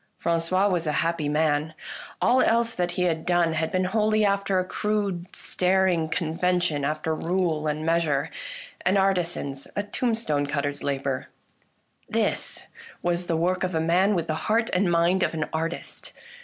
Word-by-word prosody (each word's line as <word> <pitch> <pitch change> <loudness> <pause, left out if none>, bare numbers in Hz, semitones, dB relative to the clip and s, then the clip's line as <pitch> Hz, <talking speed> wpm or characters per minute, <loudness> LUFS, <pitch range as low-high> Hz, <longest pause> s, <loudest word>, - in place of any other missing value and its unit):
Fran 170 0 +1
cois 185 +4 +2
was 170 -3 0
a 150 - +1
happy 165 -3 -1
man. 150 0 +1 0.4
All 255 +1 +4
else 230 0 +3
that 175 -1 -1
he 180 - 0
had 165 -2 0
done 175 -2 +2
had 160 0 -1
been 185 0 +1
wholly 215 +2 +2
after 200 -1 +1
a 185 - +1
crude, 200 -3 -2
staring 180 -3 +1
convention, 165 -2 0
after 155 +2 -1
rule 165 -2 0
and 155 +1 -2
measure 160 -3 +1 0.3
— - - -14
an 190 +2 +4
artisan's, 175 -8 0
a 205 - 0
tombstone 205 - 0
cutter's 145 0 -2
labour. 135 -2 -2 0.8
This - - -1 0.4
was 175 0 0
the 165 - +1
work 180 +3 0
of 185 -2 -1
a - - +2
man 180 +5 +3
with 170 -2 0
the 155 - -1 0.2
heart 225 +1 +2
and 180 -1 +2
mind 170 +3 +3
of 165 - 0
an 155 -1 -1
artist. 165 +2 -4
170 Hz, 170 wpm, -25 LUFS, 160-190 Hz, 0.8 s, All